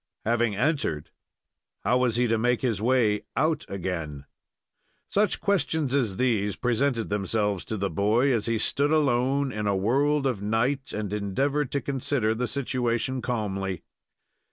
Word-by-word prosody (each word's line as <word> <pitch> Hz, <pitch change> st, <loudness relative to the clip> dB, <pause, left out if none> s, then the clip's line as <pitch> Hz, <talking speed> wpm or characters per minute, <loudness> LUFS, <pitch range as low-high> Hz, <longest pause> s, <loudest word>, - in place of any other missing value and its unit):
Having 115 Hz, -1 st, +1 dB
entered, 100 Hz, -, -1 dB, 0.7 s
how 125 Hz, -, +3 dB
was 125 Hz, -3 st, +1 dB
he 125 Hz, +1 st, +2 dB
to 115 Hz, -1 st, +1 dB
make 120 Hz, +1 st, +1 dB
his 115 Hz, -6 st, 0 dB
way 115 Hz, -3 st, +2 dB, 0.2 s
out 160 Hz, 0 st, +1 dB
again? 85 Hz, -7 st, -4 dB, 0.9 s
Such 205 Hz, -1 st, +2 dB
questions 160 Hz, -8 st, 0 dB
as 115 Hz, -9 st, +1 dB
these 105 Hz, -6 st, +1 dB
presented 120 Hz, 0 st, 0 dB
themselves 105 Hz, -1 st, 0 dB
to 110 Hz, -, -4 dB
the 100 Hz, 0 st, -2 dB
boy, 110 Hz, -, +2 dB
as 115 Hz, -2 st, 0 dB
he 115 Hz, -1 st, +1 dB
stood 140 Hz, +6 st, +1 dB
alone 140 Hz, -2 st, +2 dB
in 105 Hz, -3 st, -3 dB
a 100 Hz, -, +2 dB
world 140 Hz, +8 st, +2 dB
of 125 Hz, -7 st, 0 dB
night, 120 Hz, +6 st, 0 dB
and 105 Hz, -2 st, -4 dB
endeavored 135 Hz, +8 st, -1 dB
to 140 Hz, -, 0 dB
consider 130 Hz, -4 st, 0 dB
the 120 Hz, +2 st, -2 dB
situation 125 Hz, 0 st, -1 dB
calmly. 95 Hz, -7 st, -3 dB
120 Hz, 150 wpm, -26 LUFS, 105-135 Hz, 0.9 s, how